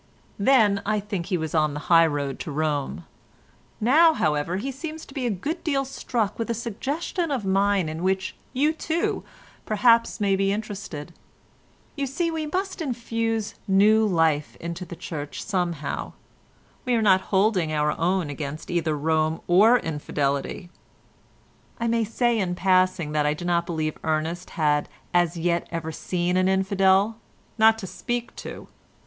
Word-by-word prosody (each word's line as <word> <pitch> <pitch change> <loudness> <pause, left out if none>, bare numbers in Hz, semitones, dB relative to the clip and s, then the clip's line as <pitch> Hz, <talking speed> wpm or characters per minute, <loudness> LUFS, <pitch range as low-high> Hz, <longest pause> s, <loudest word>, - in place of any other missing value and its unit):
"Then 205 -3 +4
I 210 +1 0
think 200 -4 -4
he 190 -2 0
was 160 -2 -4
on 155 -2 +2
the 150 - -4
high 165 +1 +5
road 140 -3 -3
to 155 - -5
Rome; 145 - -2 0.7
now, 315 +8 +5
however, 150 +4 0
he 265 +8 -3
seems 310 +3 -7
to - - -14
be 260 -3 -2
a - - +1
good 285 - -3
deal 275 -4 0
struck 235 -5 -2
with 230 - -2
a 235 - 0
suggestion 280 - -3
of 260 -8 -2
mine 195 -2 +2
in 160 +1 -5
which 190 +1 -1 0.2
you, 295 +5 +2
too, 325 +1 -1 0.4
perhaps 230 +2 +3
may 200 -2 +2
be 195 0 +1
interested. 200 -7 -5 0.8
You 280 -2 -2
see 335 +6 -1
we 315 -1 -3
must 375 +3 -3
infuse 230 -5 -2
new 210 +3 +5
life 165 -7 +1
into 170 +2 -6
the 170 - -8
Church 150 -3 -6
somehow; 175 -7 -2 0.7
we 250 -1 +1
are 230 - +2
not 190 -2 +5
holding 190 -5 +2
our 150 -1 +1
own 175 -2 0
against 145 +1 -6
either 165 -3 0
Rome 155 +1 +1
or 210 +8 +6
infidelity." 150 - -2 1.1
(I 235 - 0
may 230 -1 +1
say 235 +1 +1
in 180 -3 -1
passing 185 -4 +2
that 150 -1 +1
I 150 - +1
do 175 - -7
not 170 -1 +1
believe 155 -2 -2
Ernest 160 +3 -2
had 150 -2 +2 0.2
as 175 -1 +2
yet 170 0 0
ever 165 -1 -3
seen 175 +2 -1
an 185 0 +3
infidel—not 195 +3 +2
to 215 - -6
speak 240 +5 -4
to.) - - -8
190 Hz, 160 wpm, -25 LUFS, 160-230 Hz, 1.1 s, or